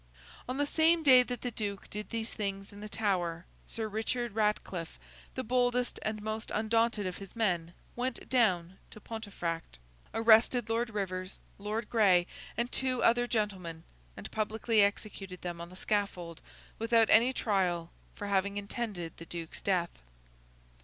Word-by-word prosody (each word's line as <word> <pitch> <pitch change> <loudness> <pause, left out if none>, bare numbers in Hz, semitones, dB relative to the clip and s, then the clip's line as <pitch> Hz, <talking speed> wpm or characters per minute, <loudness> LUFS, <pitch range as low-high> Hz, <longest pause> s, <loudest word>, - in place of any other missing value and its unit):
On 255 - -2
the 290 - +2
same 320 +2 +3
day 260 -4 +9
that 245 0 -3
the 245 - -2
Duke 205 -3 -4
did 210 0 -4
these 230 -1 -3
things 195 -1 -4
in 205 - -11
the 210 0 -7
Tower, 180 -5 0 0.2
Sir 220 -1 -3
Richard 225 +3 -1
Ratcliffe, 210 -5 -1 0.4
the 260 - -2
boldest 245 0 +1
and 215 -1 -3
most 220 +1 -3
undaunted 225 -1 +2
of 185 -1 -3
his 195 +1 -10
men, 175 -7 0 0.2
went 250 +1 -3
down 190 -8 +2
to - - -11
Pontefract; 200 - -5 0.3
arrested 225 +1 +5
Lord 230 +1 +1
Rivers, 185 -3 -3 0.2
Lord 210 +3 -3
Gray, 190 -6 +5 0.3
and 235 +1 0
two 255 -2 +1
other 240 +1 +4
gentlemen; 190 -8 -2 0.3
and - - -8
publicly 220 +1 +2
executed 200 -2 -1
them 175 -1 -4
on 170 - -7
the 180 - -12
scaffold, 185 -5 -2 0.4
without 225 0 +4
any 235 +4 +6
trial, 180 -8 0 0.2
for 205 - -5
having 200 0 +1
intended 200 -5 -4
the 165 - -9
Duke's 170 -2 -6
death. 180 -3 +1
210 Hz, 155 wpm, -31 LUFS, 185-230 Hz, 0.4 s, day